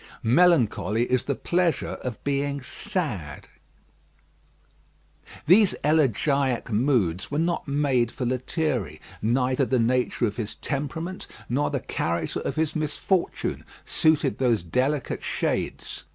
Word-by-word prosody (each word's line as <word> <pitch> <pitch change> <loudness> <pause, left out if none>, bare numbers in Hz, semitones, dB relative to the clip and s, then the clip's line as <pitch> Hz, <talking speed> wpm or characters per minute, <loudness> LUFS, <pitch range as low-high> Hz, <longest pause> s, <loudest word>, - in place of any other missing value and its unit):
Melancholy 120 - +3
is 125 0 0
the 140 - -1
pleasure 175 +2 0
of 125 -3 -6
being 140 0 -1
sad. 130 - -4 2.0
These 190 +6 +5
elegiac 140 -4 +2
moods 105 - +1
were 145 - -2
not 170 +1 0
made 140 -5 +1
for 125 - -4
Lethierry. 130 - -1 0.2
Neither 125 +4 +1
the 130 - +1
nature 125 +1 +1
of 105 -2 -3
his 110 -2 -4
temperament 160 +8 -4 0.2
nor 140 +5 0
the - - -2
character 85 +1 -2
of - - -3
his 160 -1 0
misfortune 155 +4 -1 0.2
suited 155 -1 +2
those 120 -8 +2
delicate 130 - -1
shades. - - -2
135 Hz, 115 wpm, -25 LUFS, 120-155 Hz, 2.0 s, These